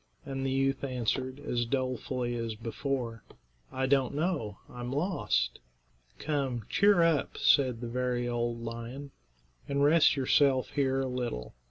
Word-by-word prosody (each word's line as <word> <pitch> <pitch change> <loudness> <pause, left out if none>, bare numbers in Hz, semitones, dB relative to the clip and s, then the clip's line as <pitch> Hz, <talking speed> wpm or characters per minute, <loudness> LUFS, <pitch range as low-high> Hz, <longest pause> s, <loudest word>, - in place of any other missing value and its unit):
And 135 -1 -4
the 135 - 0
youth 135 +1 +1
answered, 130 +1 -2
as 120 -4 -1
dolefully 130 -1 -1
as 115 -2 -3
before, 115 0 -3 0.5
"I 130 0 -1
don't 135 0 +2
know; 150 - -1
I'm 120 0 -6
lost." 135 - 0 0.6
"Come, 135 -7 -2
cheer 200 -3 +5
up," 165 -4 +1
said 130 -5 +3
the 120 - -4
very 125 0 -1
old 120 -1 -2
lion, 120 +5 -6 0.6
"and 140 0 +1
rest 155 +2 +5
yourself 135 -1 +3
here 135 -2 +1
a 135 - -1
little. 125 - -4
130 Hz, 140 wpm, -30 LUFS, 120-140 Hz, 0.6 s, cheer